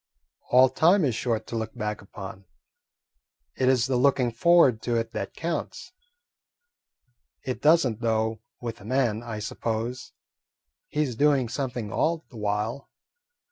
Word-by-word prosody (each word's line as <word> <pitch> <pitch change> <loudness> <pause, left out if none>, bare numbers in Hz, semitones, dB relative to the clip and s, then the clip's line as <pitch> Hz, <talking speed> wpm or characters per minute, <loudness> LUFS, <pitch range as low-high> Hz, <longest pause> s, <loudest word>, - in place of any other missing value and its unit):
"All 130 +1 +7
time 165 +7 +4
is 130 - +1
short 115 -1 -1
to - - -6
look 110 0 -4
back 105 -2 -3
upon. 95 -1 -10 1.1
It 130 -1 +2
is 130 -2 +3
the 130 -1 0
looking 130 -2 +3
forward 130 -2 +4
to 120 0 -1
it 115 0 -1
that - - -5
counts. 165 0 -4 1.5
It 130 - -4
does 160 +1 +5
n't, 115 -1 -5
though, 110 -1 0 0.2
with 115 -3 -6
a - - -12
man, 120 -3 +1
I 115 -2 -6
suppose. 115 +3 -4 0.7
He's 150 -5 -1
doing 140 -2 +3
something 125 -5 -4
all 165 0 0
the 120 - -11
while." 105 +5 -2
120 Hz, 140 wpm, -26 LUFS, 110-135 Hz, 1.5 s, All